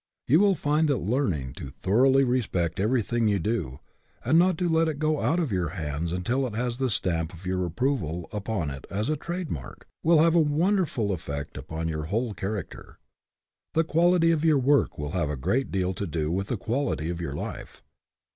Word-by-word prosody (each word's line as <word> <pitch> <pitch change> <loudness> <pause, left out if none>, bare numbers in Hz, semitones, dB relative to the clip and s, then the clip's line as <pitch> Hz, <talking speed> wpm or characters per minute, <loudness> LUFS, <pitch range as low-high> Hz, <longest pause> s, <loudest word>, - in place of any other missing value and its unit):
You 150 +6 +5
will 200 -1 +4
find 150 +1 +1
that 140 -3 +2
learning 95 - -1
to 70 - -6
thoroughly 120 - +3
respect 100 -10 0
everything 115 +1 +1
you 100 -1 +2
do, 85 - -2 0.4
and 165 - +5
not 180 -1 +3
to 180 - 0
let 165 0 +3
it 155 -3 -2
go 155 0 0
out 165 +4 +2
of 155 -8 -1
your 90 -4 0
hands 80 +1 -3
until 120 +10 0
it 110 - -7
has 120 +1 -2
the 130 -1 +1
stamp 85 -6 -1
of 85 +3 -13
your 90 0 0
approval 90 - -1
upon 100 -7 -2
it 70 -1 -8
as 105 +7 -2
a 155 - +2
trade 175 +2 -5
mark, 65 -6 -7 0.2
will 165 0 +5
have 165 +1 +5
a - - +6
wonderful 155 - +1
effect 70 -5 -5
upon 80 +1 -4
your 75 -1 -3
whole 110 +6 -1
character. 100 +1 -6 0.8
The 165 - +4
quality 165 +1 +3
of 160 -2 0
your 155 -3 +4
work 140 +2 +2
will 75 0 -4
have 85 -5 -1
a 75 - -3
great 130 - 0
deal 95 -1 0
to 100 +2 -4
do 80 -1 -2
with 95 +2 -1
the 120 - -2
quality 115 - -1
of 85 0 -5
your 70 -4 -4
life. - - -7
110 Hz, 205 wpm, -26 LUFS, -, 0.8 s, a